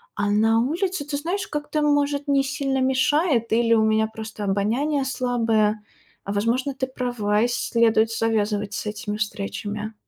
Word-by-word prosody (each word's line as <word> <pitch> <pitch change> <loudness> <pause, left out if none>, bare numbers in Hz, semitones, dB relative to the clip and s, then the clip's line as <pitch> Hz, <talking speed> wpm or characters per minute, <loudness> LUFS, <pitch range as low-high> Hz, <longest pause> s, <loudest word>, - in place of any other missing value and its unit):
а 205 0 0
на 225 +2 +3
улице, 330 - -1
ты 290 -1 -3
знаешь, 350 +7 -3
как-то, 295 0 -2
может 290 0 +1
не 275 -1 +3
сильно 270 0 -1
мешает, 260 -1 +2
или 230 0 +3
у 220 - +3
меня 220 0 +2
просто 220 -1 -8
обоняние 240 +9 0
слабое. 225 -5 0 0.4
А 200 - -5
возможно, 235 +7 0
ты 260 0 -3
права, 245 -5 -1
и - - +3
следует 230 -2 +2
завязывать 210 -2 0
с 210 - -4
этими 210 0 -4
встречами. 210 +1 -4
230 Hz, 155 wpm, -23 LUFS, 215-280 Hz, 0.4 s, на